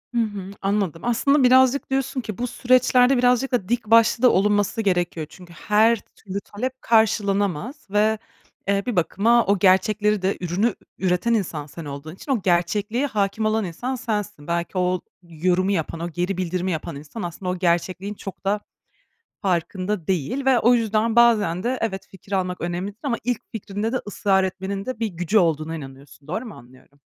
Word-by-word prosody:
Hı 235 - +3
hı 205 -3 -4
anladım. 195 -5 -1
Aslında 270 +4 +3
birazcık 260 +2 +4
diyorsun 270 0 -1
ki 215 -4 -6
bu 245 - -2
süreçlerde 255 +1 +3
birazcık 250 +1 +2
da 220 -7 -1
dik 240 -1 0
başlı 230 +2 +4
da 250 - +8
olunması 205 +2 +2
gerekiyor. 175 -5 0
Çünkü 180 -2 -14
her 220 +4 +3
türlü 200 -1 -8
talep 255 +7 -5
karşılanamaz 205 - +1
ve, 210 +2 +2 0.5
eee, 200 0 +1
bir 245 - -2
bakıma 220 +7 +3
o 200 0 +2
gerçekleri 205 +2 +3
de 190 +1 0
ürünü 180 +4 0
ü 235 - -3 0.3
üreten 180 +6 +1
insan 170 -9 -1
sen 155 +2 -10
olduğun 145 +3 -7
için 275 - -6
o 245 -6 +1
gerçekliğe 200 +8 +1
hâkim 210 -2 -1
olan 215 -1 +1
insan 245 +10 -4
sensin. 210 - -4
Belki 170 +2 -2
o 180 0 +1 0.2
yorumu 180 +3 0
yapan, 165 -3 -2
o 170 +1 -3
geri 180 +3 -2
bildirimi 185 0 -1
yapan 160 -3 -4
insan, 145 +10 -8
aslında 175 +2 -5
o 180 - -1
gerçekliğin 180 +3 0
çok 195 -1 -9
da 205 +2 +1 0.8
farkında 185 0 -1
değil 190 - -1
ve 260 -2 +4
o 240 +2 +5
yüzden 225 0 +1
bazen 210 -7 +4
de 250 +3 -1
evet, 195 -4 -3
fikir 190 +1 -15
almak 180 -2 -1
önemlidir 180 +4 -4
ama 270 -6 0
ilk 245 -1 -1
fikrinde 215 0 -3
de 255 - 0
ısrar 195 -1 +1
etmenin 190 +1 -4
de 255 -3 -4
bir 225 - +1
gücü 180 +3 +1
olduğuna 160 -3 +1
inanıyorsun. 140 0 -12
Doğru 215 +9 -3
mu 215 - -9
anlıyorum? 130 +3 -18
200 Hz, 175 wpm, -23 LUFS, 180-230 Hz, 0.8 s, da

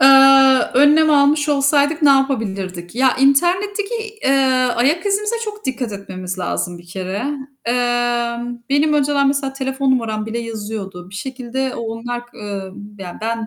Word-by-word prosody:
Aaa, 270 -1 +6
önlem 300 +3 +5
almış 290 +1 +3
olsaydık 285 +2 +2
ne 290 - +6
yapabilirdik? 200 -10 -1
Ya, 260 +1 +2
internetteki, 370 - +1 0.3
eee, - - +3 0.5
ayak 295 - +1
izimize 420 +3 0
çok 425 -1 -8
dikkat 250 -3 -3
etmemiz 185 -2 -7
lazım 175 -1 -3
bir 175 - -16
kere. 190 +4 -5 0.4
Emm, 240 0 -1
benim 290 +2 +2
önceden 280 -1 +2
mesela 275 -1 -1
telefon 265 0 -2
numaram 220 -4 -1
bile 225 +1 -4
yazıyordu. 210 -5 -6
Bir - - -13
şekilde 260 +3 -4
o - - -5
onlar 240 +2 -5
k 240 - -19
eee, 200 -2 -6 0.3
ya, 180 -2 -8
ben 225 0 -3
255 Hz, 145 wpm, -18 LUFS, 220-280 Hz, 0.5 s, Aaa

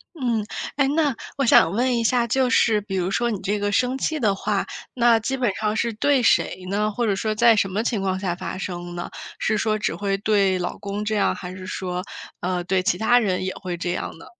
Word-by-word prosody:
嗯， 235 -7 -1 0.3
哎， 275 -1 +2
那 295 -4 +1 0.2
我 275 - +2
想 165 -7 +6
问 245 +3 +1
一 230 - 0
下 240 +1 +2
就 260 +3 +2
是 225 -2 +3
比 195 -2 -5
如 180 0 0
说 235 +4 0
你 200 - -3
这 205 +2 -1
个 205 0 -1
生 250 +5 +1
气 315 +3 -1
的 210 -6 +2
话， 200 0 -1 0.3
那 235 -2 +4
基 265 +5 -2
本 245 -6 +1
上 215 0 -1
是 235 +1 0
对 275 +4 +2
谁 185 -4 +2
呢？ 210 +2 0
或 235 +2 -1
者 200 - +2
说 215 +2 -1
在 230 +1 +5
什 200 -2 +2
么 210 +4 -1
情 230 -2 0
况 190 -1 -1
下 185 -3 -2
发 185 - -5
生 175 -2 -5
呢？ 175 0 -5 0.3
是 215 0 +1
说 215 0 0
只 - - -1
会 200 -1 -1
对 200 -3 +2
老 175 - -3
公 205 +1 -4
这 215 0 -1
样？ 205 - +2
还 180 0 -7
是 185 0 -9
说， 180 -1 -4 0.4
呃， 180 0 -1
对 185 +1 0
其 180 - +2
他 245 +2 +4
人 190 -6 +1
也 190 - -3
会 180 -3 -5
这 175 +1 -4
样 - - -4
呢？ - - -12
210 Hz, 260 characters per minute, -23 LUFS, 190-235 Hz, 0.4 s, 想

